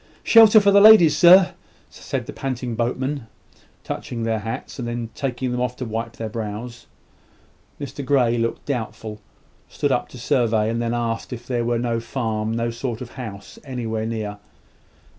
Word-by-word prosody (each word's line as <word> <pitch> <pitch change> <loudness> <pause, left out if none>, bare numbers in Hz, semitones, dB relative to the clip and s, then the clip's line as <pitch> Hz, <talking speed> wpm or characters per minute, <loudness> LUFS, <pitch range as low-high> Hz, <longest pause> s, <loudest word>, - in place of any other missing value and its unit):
"Shelter 225 -1 +7
for 200 -1 +3
the 200 0 +6
ladies, 200 -8 +8
sir," 180 +3 +7 0.4
said - - -5
the - - -8
panting 125 -3 -4
boatmen, 125 +3 -2 0.6
touching 115 -2 -5
their 115 -1 0
hats, 115 +5 -6
and 120 - -3
then 120 -1 -4
taking 130 -3 -3
them 125 0 -2
off 125 0 -1
to 125 - -5
wipe 115 +1 -4
their 115 - -4
brows. 110 +2 -6 0.9
Mr 140 0 -6
Grey 125 -3 +2
looked 115 0 -2
doubtful, 110 -5 -5 0.5
stood - - -1
up - - 0
to - - -11
survey, 115 -4 +1
and 115 +1 -2
then 120 0 -1
asked 115 0 -3
if 120 -1 -7
there 120 -2 -1
was 120 0 -1
no 115 -1 0
farm, 110 -2 -3
no 115 +1 -1
sort 115 -1 -4
of 125 - -8
house 105 -6 -9
anywhere 115 -5 -3
near. 105 -2 -4
120 Hz, 170 wpm, -22 LUFS, 115-130 Hz, 0.9 s, ladies